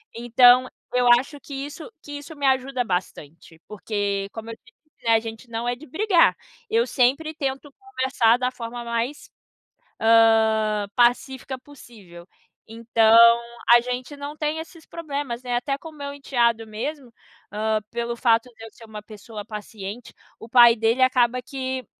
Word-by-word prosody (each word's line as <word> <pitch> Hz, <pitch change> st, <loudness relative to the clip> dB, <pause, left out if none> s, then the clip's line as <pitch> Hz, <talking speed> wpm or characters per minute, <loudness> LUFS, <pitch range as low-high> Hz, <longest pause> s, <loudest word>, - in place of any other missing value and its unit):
Então, 245 Hz, +2 st, +5 dB, 0.3 s
eu 250 Hz, 0 st, +2 dB
acho 285 Hz, +3 st, -8 dB
que 280 Hz, -, -12 dB
isso 290 Hz, +7 st, -7 dB
que 290 Hz, -, -11 dB
isso 300 Hz, +3 st, -11 dB
me 285 Hz, -1 st, -4 dB
ajuda 265 Hz, -1 st, +1 dB
bastante, 170 Hz, -5 st, -6 dB
porque, 200 Hz, -1 st, -3 dB
como 225 Hz, 0 st, -8 dB
eu -, -, -8 dB
te 455 Hz, -, -24 dB, 0.2 s
disse, 300 Hz, -, -28 dB
né, 230 Hz, -, +5 dB
a -, -, +4 dB
gente 225 Hz, +2 st, -9 dB
não 230 Hz, +1 st, -4 dB
é 245 Hz, -, 0 dB
de 300 Hz, +6 st, -14 dB
brigar. 370 Hz, +4 st, +3 dB, 0.3 s
Eu 455 Hz, +2 st, +2 dB
sempre 280 Hz, -, +1 dB
tento 275 Hz, -1 st, -5 dB
conversar 260 Hz, -, +1 dB
da 250 Hz, 0 st, -1 dB
forma 240 Hz, -1 st, -7 dB
mais, 235 Hz, +5 st, -3 dB, 0.7 s
hã, 220 Hz, -2 st, +3 dB
pacífica 260 Hz, +2 st, +1 dB
possível. 215 Hz, -11 st, -15 dB, 0.4 s
Então, 225 Hz, 0 st, +3 dB, 0.6 s
a 240 Hz, -, +8 dB
gente 250 Hz, +4 st, -5 dB
não 285 Hz, +1 st, -7 dB
tem 305 Hz, +1 st, -2 dB
esses 325 Hz, 0 st, -11 dB
problemas, 285 Hz, -7 st, -5 dB
né. 245 Hz, -1 st, -3 dB
Até 275 Hz, +3 st, -2 dB
com 325 Hz, -, -12 dB
o -, -, -14 dB
meu 280 Hz, 0 st, -6 dB
enteado 235 Hz, -5 st, 0 dB
mesmo, 245 Hz, +4 st, -6 dB, 0.4 s
hã, 215 Hz, +1 st, -1 dB
pelo 235 Hz, 0 st, -4 dB
fato 230 Hz, 0 st, +2 dB
de 225 Hz, -, -12 dB
eu -, -, -10 dB
ser -, -, -17 dB
uma 215 Hz, -1 st, -9 dB
pessoa 210 Hz, 0 st, -10 dB
paciente 210 Hz, +1 st, -8 dB, 0.2 s
o 225 Hz, -, -12 dB
pai 240 Hz, -1 st, +7 dB
dele 225 Hz, +3 st, +1 dB
acaba 250 Hz, -1 st, +3 dB
que 260 Hz, 0 st, -5 dB
245 Hz, 165 wpm, -23 LUFS, 225-275 Hz, 0.7 s, a